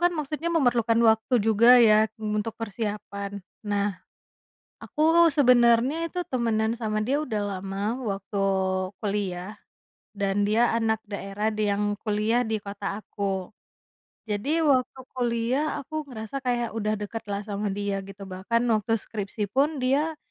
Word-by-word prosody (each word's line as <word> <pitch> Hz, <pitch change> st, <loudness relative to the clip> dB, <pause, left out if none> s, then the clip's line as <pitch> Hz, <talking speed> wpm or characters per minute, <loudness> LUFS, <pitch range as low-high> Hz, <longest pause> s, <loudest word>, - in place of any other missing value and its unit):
kan 350 Hz, 0 st, +4 dB
maksudnya 305 Hz, +2 st, -3 dB
memerlukan 245 Hz, -8 st, +2 dB
waktu 220 Hz, +3 st, 0 dB
juga 230 Hz, +3 st, +7 dB
ya, 220 Hz, -2 st, +6 dB
eee, 220 Hz, -1 st, -5 dB
untuk 215 Hz, +1 st, -3 dB
persiapan. 205 Hz, -2 st, -5 dB, 0.3 s
Nah, 205 Hz, 0 st, +1 dB, 0.9 s
aku 325 Hz, +2 st, +4 dB
sebenernya 250 Hz, -1 st, +4 dB
itu 360 Hz, -, -5 dB
temenan 230 Hz, -5 st, 0 dB
sama 220 Hz, -2 st, -2 dB
dia 285 Hz, +3 st, +1 dB
udah 220 Hz, -8 st, -2 dB, 0.2 s
lama, 195 Hz, +3 st, -3 dB
waktu 200 Hz, -2 st, -4 dB, 0.6 s
kuliah 200 Hz, -2 st, -3 dB, 0.6 s
dan 200 Hz, 0 st, 0 dB
dia 230 Hz, +3 st, +3 dB
anak 225 Hz, -1 st, +1 dB
daerah 205 Hz, +1 st, -3 dB
d 210 Hz, -1 st, 0 dB
yang 200 Hz, +1 st, 0 dB, 0.2 s
kuliah 215 Hz, +2 st, +1 dB
di 220 Hz, -2 st, -1 dB
kota 200 Hz, -1 st, -5 dB
aku. 200 Hz, -2 st, -4 dB, 0.8 s
Jadi 265 Hz, +11 st, 0 dB
waktu 260 Hz, -3 st, +2 dB
kuliah, 240 Hz, +3 st, 0 dB, 0.2 s
aku 310 Hz, +3 st, -5 dB
ngerasa 220 Hz, 0 st, -7 dB
kayak 240 Hz, -2 st, 0 dB
udah 215 Hz, -1 st, 0 dB
deketlah 205 Hz, -1 st, -4 dB
sama 205 Hz, 0 st, -3 dB
dia 200 Hz, 0 st, -2 dB
gitu, 195 Hz, 0 st, -10 dB
bahkan 190 Hz, +5 st, -1 dB
waktu 215 Hz, +1 st, 0 dB
skripsi 205 Hz, 0 st, -4 dB
pun 285 Hz, +2 st, +1 dB
dia, 290 Hz, +5 st, +1 dB
220 Hz, 135 wpm, -26 LUFS, 205-245 Hz, 0.9 s, juga